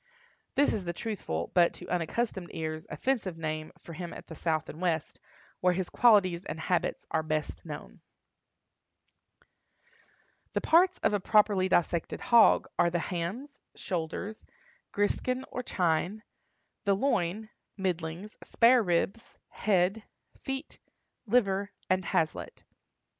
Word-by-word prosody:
This 285 - +4
is 205 - -2
the 170 -1 -3
truthful, 85 - -3
but, 175 -1 +4
to 180 - -10
unaccustomed 180 +2 -2
ears, 155 -1 -4
offensive 225 -10 -1
name 155 -1 -4
for 170 - -11
him 175 +1 -6
at - - -10
the - - -10
South 160 -1 -1
and 155 - -9
West, 165 -4 -1 0.4
where 180 0 +3
his 185 -1 -3
qualities 195 -7 +4
and 160 - -6
habits 175 +2 -1
are 160 - +2
best 155 -1 -3
known. - - -8 2.5
The - - 0
parts 360 +3 +4
of - - +3
a 205 - +2
properly 200 -2 +3
dissected 170 -1 +1
hog 235 -2 +5
are 170 - +5
the 175 - 0
hams, 190 - -4 0.2
shoulders, 180 +5 -4 0.5
griskin 255 +5 0
or 250 - -3
chine, 180 0 0 0.6
the 200 -2 +3
loin, 215 -3 0 0.3
middlings, 180 +1 -3
spare 245 +1 +5
ribs, 190 +3 -1
head, 195 +1 +1 0.3
feet, 270 +2 -6 0.5
liver, 200 -3 +2 0.2
and 185 -1 +2
haslet. 160 -2 -1
185 Hz, 125 wpm, -29 LUFS, 170-215 Hz, 2.5 s, hog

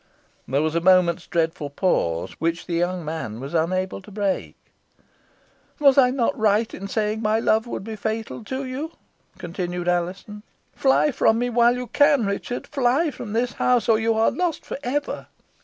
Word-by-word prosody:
There 140 +3 +1
was 155 0 0
a 170 - +1
moment's 180 -1 +3
dreadful 160 -3 -1
pause, 85 - 0
which 165 +1 -1
the 175 - -5
young 175 0 -1
man 150 -9 -5
was 135 +4 -7
unable 185 +4 0
to 190 - -14
break. 200 -1 -2 1.2
"Was 280 -3 +6
I 260 -3 +6
not 250 -2 0
right 215 +1 +1
in 195 - -6
saying 215 +1 -1
my 215 0 +2
love 220 +1 +2
would 215 - -5
be 220 +1 -6
fatal 220 +2 -4
to 265 +4 -4
you?" 280 +6 -5 0.4
continued 175 0 -4
Alizon. 180 +4 -2 0.3
"Fly 275 +2 +3
from 225 -3 +3
me 245 +1 -1
while 240 +1 +4
you 250 0 -4
can, 285 -2 +3
Richard. 200 +5 -3
Fly 280 +3 +1
from 215 -5 -7
this 240 +2 0
house, 245 -3 +2
or 220 -2 +4
you 225 0 +1
are 220 +1 +3
lost 350 -3 -2
for - - -6
ever!" 285 +3 -3
215 Hz, 175 wpm, -23 LUFS, 175-245 Hz, 1.2 s, Was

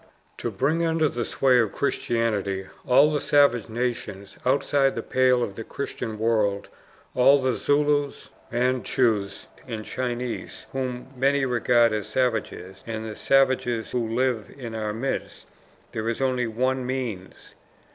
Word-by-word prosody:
To - - -3
bring 155 +5 0
under 160 -1 +2
the 120 -4 -2
sway 130 +1 +3
of 110 -4 +1
Christianity 105 -8 -1 0.2
all 140 +4 +6
the 150 -2 0
savage 140 -6 +3
nations 105 -4 -4
outside 135 +1 +2
the - - -3
pale 130 -1 +3
of 100 - -3
the 115 - -7
Christian 115 -3 -5
world 105 -3 0 0.4
all 135 +3 +5
the 130 -1 +1
Zulus, 145 +1 0 0.2
Mandchoos, 120 -4 0 0.2
and 110 -3 -5
Chinese, 125 -1 -4
whom 130 0 -4
many 135 +2 +2
regard 120 -2 +3
as 105 -1 -2
savages 110 -5 -2
and 110 -1 -4
the 110 -1 -6
savages 130 -4 +2
who 115 -2 -1
live 125 -4 0
in 120 -4 -7
our 110 -1 -2
midst, 120 +6 -4 0.5
there 110 0 -2
is 115 - -2
only 130 -2 +1
ONE 130 +3 0
MEANS. 125 -7 -5
125 Hz, 140 wpm, -25 LUFS, 110-130 Hz, 0.5 s, all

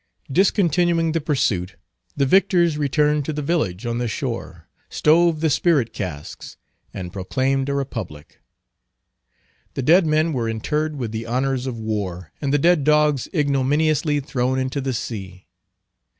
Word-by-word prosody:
Discontinuing 175 -1 +2
the 165 0 -1
pursuit, 105 - -1 0.4
the 140 - +3
victors 175 0 +3
returned 150 0 +1
to 155 - -3
the 150 0 -3
village 120 - -1
on 120 0 -2
the 120 - -1
shore, 105 - -5 0.2
stove 160 0 +3
the 160 - +2
spirit 140 -9 +2
casks, 75 -5 -7 0.3
and 90 -2 -7
proclaimed 135 +8 -1
a 140 - -1
Republic. 110 - -6 1.4
The 135 - -2
dead 165 +5 +5
men 155 +1 +2
were 120 -4 -1
interred 150 +8 -2
with 120 -6 -4
the 115 +1 -5
honors 130 +2 -1
of 125 -3 -4
war, 100 -6 -4
and 140 -2 -1
the 145 - +3
dead 170 0 +3
dogs 150 -2 +3
ignominiously 145 0 +1
thrown 130 -2 -1
into 130 +2 -2
the 135 -1 -2
sea. 95 -6 -6
140 Hz, 145 wpm, -22 LUFS, 115-155 Hz, 1.4 s, dead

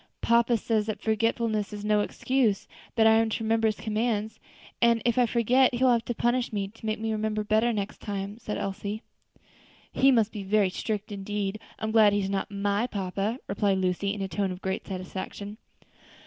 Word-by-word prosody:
'" - - -48
"Papa 235 0 +3
says 220 -1 0
that 215 - -3
forgetfulness 220 -1 0
is 205 0 -6
no 210 0 +3
excuse; 225 0 0 0.3
that 225 -2 +4
I 220 - +7
am 225 0 +2
to 220 - -3
remember 225 0 +2
his 215 - 0
commands, 220 0 -2 0.4
and 235 -1 +5
if 240 +1 +2
I 245 - +4
forget, 245 +3 +3
he 245 - 0
will 255 - +6
have 235 -1 +1
to 240 - -3
punish 240 +2 +1
me, 200 -2 -2
to 225 +2 -14
make 215 0 -1
me 225 0 -2
remember 215 0 -1
better 220 +3 +2
next 205 -2 -4
time," 200 +1 -5
said 210 -2 -4
Elsie. 200 +2 -4 0.9
"He 270 - +4
must 225 -4 +3
be 210 - -6
very 195 -1 +2
strict 210 +2 -3
indeed; 205 0 -3 0.2
I'm 220 - -3
glad 215 -2 +6
he 205 - +2
is 195 -1 -2
not 195 +2 -1
my 205 +3 0
papa," 200 +1 -2
replied 195 0 +1
Lucy, 185 +1 0
in 205 -1 -3
a - - -2
tone 190 +2 -1
of 180 +1 -8
great 190 0 -3
satisfaction. 190 +2 -6
215 Hz, 205 wpm, -27 LUFS, 200-225 Hz, 0.9 s, I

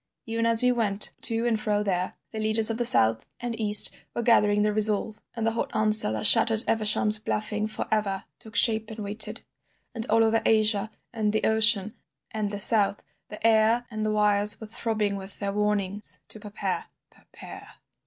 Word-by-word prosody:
Even 230 -1 -4
as 230 +1 +2
we 250 - +2
went 210 -4 -3
to 230 0 -3
and 230 -2 -2
fro 210 -1 -3
there, 185 -2 -4 0.2
the 220 - -8
leaders 220 +1 +1
of 225 - -6
the 240 - -1
south 110 - +4
and 240 -1 -6
east 210 -1 +7 0.2
were 235 - -4
gathering 210 -3 +1
their 210 0 -2
resolve, 215 0 +3
and 230 -2 -5
the 225 - -1
hot 230 - -5
answer 215 - +5
that 110 -1 -4
shattered 225 -1 +5
Evesham's 215 -1 0
bluffing 215 0 -5
for 215 - -5
ever, 200 -3 -3 0.2
took 220 0 -15
shape 220 -2 0
and 220 - -11
waited. 210 0 0 0.5
And, 230 0 -2
all 225 +1 +1
over 225 0 -1
Asia, 215 -1 0 0.2
and 215 -2 -3
the 215 - -3
ocean, 215 -2 0 0.4
and 215 -2 -5
the 205 0 -8
South, 205 -1 +3 0.2
the 210 +1 -10
air 225 +2 +1
and 215 -1 -6
the 215 - -3
wires 210 0 +3
were 220 - -10
throbbing 215 -2 -4
with 195 0 -11
their 200 -1 -6
warnings 210 -1 0
to 215 - -10
prepare—prepare. 210 0 -10
215 Hz, 185 wpm, -23 LUFS, 210-225 Hz, 0.5 s, east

